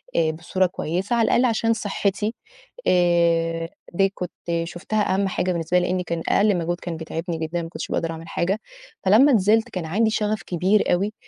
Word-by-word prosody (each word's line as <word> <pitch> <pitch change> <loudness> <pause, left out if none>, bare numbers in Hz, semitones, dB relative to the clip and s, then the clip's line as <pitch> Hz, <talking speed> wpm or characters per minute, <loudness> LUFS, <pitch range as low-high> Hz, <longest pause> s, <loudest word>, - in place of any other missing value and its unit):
آآ 160 -1 +3
بصورة 170 +4 0
كويسة 180 +4 -2
على 230 -1 +3
الأقَل 245 - +3
عشان 230 -1 +2
صحِّتي 205 0 -1 0.5
آآ 170 -2 +2 0.2
دي 195 +2 +3
كنت 180 - -5 0.3
شُفتها 190 +5 -1
أهَم 195 +1 +1
حاجة 185 -1 -1
بالنسبة 170 +1 +1
لي 180 - 0
لإن 185 0 0
كان 170 -1 -3
أقل 205 -2 +3
مجهود 175 +1 -2
كان 170 -2 -5
بيتعبني 165 +1 -4
جدًا 165 +2 -3
ما 165 - -6
كنتش - - -6
باقدر 165 0 -1
أعمل 165 0 -8
حاجة. 190 +6 -1 0.5
فلمّا 245 +9 +6
نزلت 220 +2 +3
كان 180 -7 -4
عندي 220 +7 +1
شَغَف 215 -2 -1
كبير 185 +2 +2
أوي 200 +4 0
180 Hz, 180 wpm, -23 LUFS, 170-210 Hz, 0.5 s, فلمّا